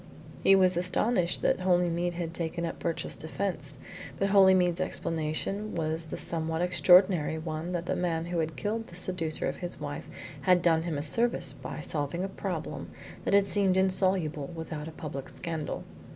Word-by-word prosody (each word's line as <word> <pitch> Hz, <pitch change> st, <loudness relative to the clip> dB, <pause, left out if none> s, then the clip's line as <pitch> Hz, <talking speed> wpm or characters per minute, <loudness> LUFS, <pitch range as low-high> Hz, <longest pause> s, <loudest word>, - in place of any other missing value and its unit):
He 195 Hz, -, +7 dB
was 185 Hz, -2 st, +4 dB
astonished 180 Hz, +1 st, +1 dB
that -, -, +2 dB
Holymead 175 Hz, -1 st, +1 dB
had 170 Hz, -1 st, -4 dB
taken 170 Hz, 0 st, -2 dB
up 165 Hz, -, -5 dB
Birchill's 165 Hz, -1 st, -3 dB
defence, 160 Hz, -3 st, -3 dB, 0.4 s
but 195 Hz, +3 st, +1 dB
Holymead's 185 Hz, -3 st, +5 dB
explanation 165 Hz, +5 st, -2 dB
was 160 Hz, 0 st, 0 dB
the 155 Hz, -, -6 dB
somewhat 160 Hz, 0 st, -1 dB
extraordinary 180 Hz, -3 st, +4 dB
one 160 Hz, +1 st, -4 dB
that 175 Hz, -1 st, -2 dB
the -, -, -1 dB
man 165 Hz, -2 st, -1 dB
who 175 Hz, 0 st, -2 dB
had 160 Hz, 0 st, -2 dB
killed 225 Hz, +2 st, -3 dB
the 170 Hz, -, -12 dB
seducer 180 Hz, -3 st, -1 dB
of -, -, -3 dB
his 175 Hz, -1 st, -2 dB
wife -, -, -6 dB, 0.3 s
had 180 Hz, -2 st, +4 dB
done 165 Hz, -2 st, +4 dB
him 165 Hz, -3 st, -3 dB
a 145 Hz, -, -2 dB
service 230 Hz, +10 st, +2 dB
by -, -, -7 dB
solving 150 Hz, +4 st, -1 dB
a -, -, -1 dB
problem -, -, -5 dB, 0.4 s
that -, -, +3 dB
had 200 Hz, -1 st, +5 dB
seemed 195 Hz, -2 st, +3 dB
insoluble 185 Hz, -6 st, +1 dB
without 160 Hz, -2 st, -5 dB
a -, -, -7 dB
public 140 Hz, -4 st, -7 dB
scandal. 165 Hz, -3 st, -4 dB
175 Hz, 170 wpm, -29 LUFS, 160-185 Hz, 0.4 s, He